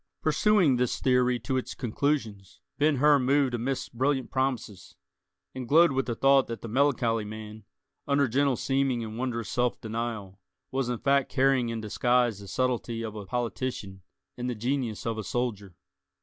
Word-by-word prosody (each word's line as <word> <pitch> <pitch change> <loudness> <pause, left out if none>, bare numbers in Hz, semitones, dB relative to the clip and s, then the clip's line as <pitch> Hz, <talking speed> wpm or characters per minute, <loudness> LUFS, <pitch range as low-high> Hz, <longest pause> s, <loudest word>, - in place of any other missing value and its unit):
Pursuing 195 - +3
this 125 -1 0
theory 125 -1 +2
to 130 -2 -1
its 130 - -4
conclusions, 110 - -2 0.2
Ben 150 0 +3
Hur 145 +2 +5
moved 135 0 +2
amidst 125 +3 -3
brilliant 130 +1 0
promises, 120 -9 -3 0.6
and 125 -2 -7
glowed 165 +2 +6
with 135 0 -1
the 120 - -2
thought 135 +2 +4
that 115 -1 -6
the - - -5
melancholy 120 -3 +1
man, 110 0 -9 0.4
under 140 -1 +3
gentle 135 +2 +2
seeming 135 -2 0
and 110 +1 -6
wondrous 120 -3 -3
self 125 -2 0
denial, 110 -3 -5 0.3
was 130 -2 -1
in 120 - -1
fact 140 +2 +1
carrying 130 -3 +2
in 115 -1 -3
disguise 120 0 +1
the 100 - -11
subtlety 120 0 -1
of 110 -2 -5
a 105 -2 -7
politician 120 -4 -4 0.4
and 125 0 -3
the 125 - -2
genius 120 -1 -2
of 115 -1 -2
a - - -3
soldier. 105 -5 -3
125 Hz, 165 wpm, -27 LUFS, 110-135 Hz, 0.6 s, glowed